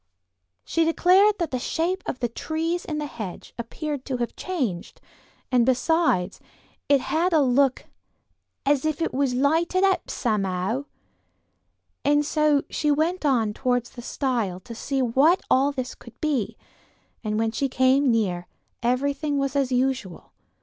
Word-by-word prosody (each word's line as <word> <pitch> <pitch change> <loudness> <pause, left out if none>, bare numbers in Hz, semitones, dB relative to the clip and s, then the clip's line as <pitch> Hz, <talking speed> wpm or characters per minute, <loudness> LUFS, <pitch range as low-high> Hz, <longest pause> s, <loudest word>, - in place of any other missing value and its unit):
'" 90 +2 -53
She 330 - +1
declared 375 +5 +4
that 340 -4 -2
the 255 - -1
shape 345 +8 -1
of 255 - -4
the 240 - +2
trees 325 +8 -3
in 305 - -3
the 300 - -2
hedge 215 -10 -7
appeared 285 +4 -4
to 260 -2 -2
have 240 -1 -3
changed, 255 - -3 0.5
and 250 -2 +4
besides, 255 - +1 0.5
it 280 -2 +5
had 340 +6 0
a 315 - +5
look 270 -1 +2 0.8
"as 280 -1 +2
if 310 -2 -1
it 330 - -1
was 265 -1 +1
lighted 325 +8 +2
up, 385 -3 +2
somehow," 205 +2 -1 1.2
and 290 +1 +3
so 300 -1 +2
she 300 - -1
went 315 +3 +1
on 225 -6 +2
towards 245 0 -1
the 240 - -9
stile 235 -8 -2
to 230 - -9
see 270 +3 -1
what 280 +10 +3
all 275 +2 +4
this 260 -3 -4
could - - -16
be, 290 -9 -1 0.7
and 215 -1 -1
when 225 0 +1
she 275 +4 -1
came 260 +2 +3
near 185 -7 0 0.3
everything 280 +4 0
was 275 0 -1
as 275 -2 +1
usual. 255 -8 -1
270 Hz, 155 wpm, -24 LUFS, 235-305 Hz, 1.2 s, it